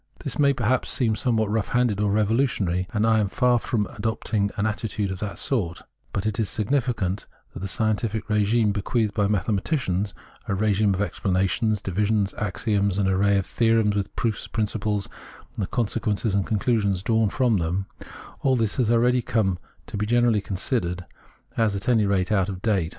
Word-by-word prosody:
This -, -, -5 dB
may 140 Hz, -1 st, +5 dB
perhaps 125 Hz, -1 st, 0 dB
seem 115 Hz, -4 st, +1 dB
somewhat 110 Hz, -4 st, 0 dB
rough 110 Hz, -1 st, 0 dB
handed 120 Hz, -5 st, +1 dB
or 105 Hz, -1 st, +1 dB
revolutionary; 105 Hz, -4 st, +1 dB
and 105 Hz, 0 st, +1 dB
I 110 Hz, -1 st, +4 dB
am 105 Hz, -, +1 dB
far 120 Hz, +4 st, +2 dB
from 110 Hz, -3 st, -1 dB
adopting 105 Hz, -1 st, -2 dB
an 100 Hz, -, 0 dB
attitude 105 Hz, -2 st, -2 dB
of 95 Hz, -, -5 dB
that 105 Hz, -1 st, -4 dB
sort; 95 Hz, -11 st, -1 dB, 0.3 s
but 100 Hz, -, -3 dB
it 110 Hz, -1 st, -1 dB
is 110 Hz, -, +1 dB
significant 110 Hz, -5 st, -1 dB, 0.3 s
that -, -, -7 dB
the 100 Hz, -, -4 dB
scientific 110 Hz, 0 st, -1 dB
regime 105 Hz, +1 st, +2 dB
bequeathed 105 Hz, +1 st, -1 dB
by 105 Hz, -2 st, +1 dB
mathematics 100 Hz, -, -1 dB, 0.2 s
— 125 Hz, -, -28 dB
a 100 Hz, -, 0 dB
regime 105 Hz, 0 st, +2 dB
of 100 Hz, -, 0 dB
explanations, 100 Hz, +2 st, 0 dB
divisions, 100 Hz, +1 st, 0 dB
axioms, 100 Hz, -1 st, 0 dB
an 100 Hz, -2 st, +2 dB
array 100 Hz, +1 st, +3 dB
of 95 Hz, -, 0 dB
theorems, 115 Hz, -3 st, +2 dB
with 100 Hz, -2 st, -3 dB
proofs, 110 Hz, -3 st, -2 dB
principles, 105 Hz, -2 st, -1 dB, 0.5 s
and -, -, -4 dB
the 95 Hz, -, -1 dB
consequences 110 Hz, -3 st, -1 dB
and 100 Hz, -1 st, +1 dB
con 110 Hz, -, 0 dB
clusions 100 Hz, -4 st, +1 dB
drawn 110 Hz, -1 st, +2 dB
from 120 Hz, -1 st, +2 dB
them 90 Hz, +3 st, -1 dB, 0.3 s
— -, -, -15 dB
all 130 Hz, -1 st, +3 dB
this 110 Hz, -4 st, 0 dB
has 120 Hz, -4 st, +2 dB
already 120 Hz, +2 st, +3 dB
come 95 Hz, -6 st, 0 dB, 0.3 s
to -, -, -6 dB
be 105 Hz, +1 st, -1 dB
generally 120 Hz, -2 st, +3 dB
considered 90 Hz, -3 st, -2 dB, 0.5 s
as 110 Hz, -3 st, +2 dB
at 100 Hz, -, -5 dB
any 110 Hz, -4 st, +3 dB
rate 95 Hz, -1 st, +1 dB
out 100 Hz, -2 st, +2 dB
of 95 Hz, -1 st, -6 dB
date. 95 Hz, -7 st, +1 dB
105 Hz, 185 wpm, -24 LUFS, 100-115 Hz, 0.5 s, may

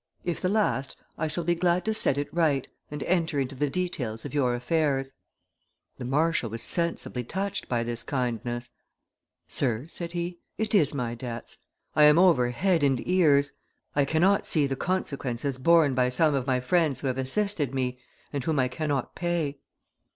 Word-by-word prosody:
If 175 Hz, -1 st, -2 dB
the 185 Hz, -, +1 dB
last, 200 Hz, -10 st, 0 dB, 0.2 s
I 160 Hz, -, -1 dB
shall 155 Hz, +3 st, -3 dB
be 175 Hz, +1 st, +2 dB
glad 175 Hz, +1 st, +1 dB
to 220 Hz, -, +1 dB
set 140 Hz, -10 st, +2 dB
it 145 Hz, -, -3 dB
right, 155 Hz, -6 st, +1 dB, 0.2 s
and 150 Hz, -1 st, -5 dB
enter 165 Hz, -5 st, +1 dB
into 135 Hz, 0 st, -2 dB
the 145 Hz, +2 st, -1 dB
details 135 Hz, -10 st, -3 dB
of 145 Hz, -, -6 dB
your 125 Hz, -4 st, +2 dB
affairs.' 135 Hz, 0 st, 0 dB, 0.9 s
The -, -, -5 dB
marshal 150 Hz, -1 st, +1 dB
was 115 Hz, +2 st, -4 dB
sensibly 170 Hz, -7 st, -1 dB
touched 195 Hz, -, -3 dB
by 120 Hz, -2 st, +1 dB
this 120 Hz, 0 st, -3 dB
kindness: 120 Hz, -2 st, -3 dB, 0.8 s
'Sir,' 120 Hz, -2 st, -1 dB
said 170 Hz, 0 st, -3 dB
he, 175 Hz, 0 st, -3 dB, 0.2 s
'it 220 Hz, 0 st, -1 dB
is 155 Hz, -8 st, +4 dB
my 120 Hz, -4 st, -2 dB
debts; 120 Hz, -1 st, -7 dB, 0.4 s
I 150 Hz, -, +7 dB
am 150 Hz, +1 st, +7 dB
over 170 Hz, -10 st, +5 dB
head 175 Hz, +7 st, +1 dB
and 135 Hz, -3 st, +2 dB
ears. 145 Hz, -6 st, +4 dB, 0.4 s
I 140 Hz, -1 st, +3 dB
cannot 175 Hz, +7 st, +2 dB
see 150 Hz, -3 st, +3 dB
the 135 Hz, -1 st, -1 dB
consequences 140 Hz, -6 st, -2 dB
borne 160 Hz, -1 st, +5 dB
by 125 Hz, 0 st, +2 dB
some 150 Hz, +4 st, +2 dB
of 135 Hz, -1 st, -1 dB
my 130 Hz, -1 st, +1 dB
friends 155 Hz, +1 st, +1 dB
who -, -, -6 dB
have 130 Hz, 0 st, -1 dB
assisted 150 Hz, -, 0 dB
me, 125 Hz, -1 st, -2 dB, 0.3 s
and 140 Hz, -2 st, -2 dB
whom 155 Hz, +2 st, 0 dB
I 130 Hz, -1 st, +2 dB
cannot 145 Hz, 0 st, -2 dB
pay. 165 Hz, -5 st, -2 dB
145 Hz, 180 wpm, -27 LUFS, 125-170 Hz, 0.9 s, I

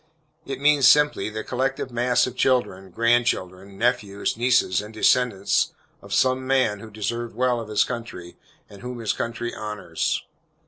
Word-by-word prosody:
It 135 Hz, -1 st, -4 dB
means 145 Hz, -2 st, +5 dB
simply, 150 Hz, -4 st, +4 dB
the 110 Hz, 0 st, -5 dB
collective 130 Hz, 0 st, -2 dB
mass 120 Hz, +1 st, +2 dB
of 130 Hz, -, -6 dB
children, 120 Hz, -8 st, 0 dB
grand 115 Hz, +4 st, +2 dB
children, 95 Hz, +1 st, -3 dB
nephews, 100 Hz, -4 st, 0 dB
nieces, 120 Hz, -5 st, +2 dB
and 105 Hz, +1 st, -10 dB
descendants, 110 Hz, -2 st, +2 dB, 0.3 s
of 100 Hz, -, -14 dB
some 130 Hz, +5 st, +1 dB
man 130 Hz, -6 st, +2 dB
who 110 Hz, -, -10 dB
deserved 115 Hz, +2 st, -4 dB
well 125 Hz, -1 st, +1 dB
of 115 Hz, -2 st, -7 dB
his 105 Hz, -, +3 dB
country, 115 Hz, -8 st, -7 dB, 0.3 s
and 100 Hz, -, -14 dB
whom 125 Hz, 0 st, -6 dB
his 115 Hz, -3 st, -1 dB
country 115 Hz, 0 st, -4 dB
honors. 105 Hz, -6 st, -3 dB
115 Hz, 155 wpm, -23 LUFS, 105-125 Hz, 0.3 s, means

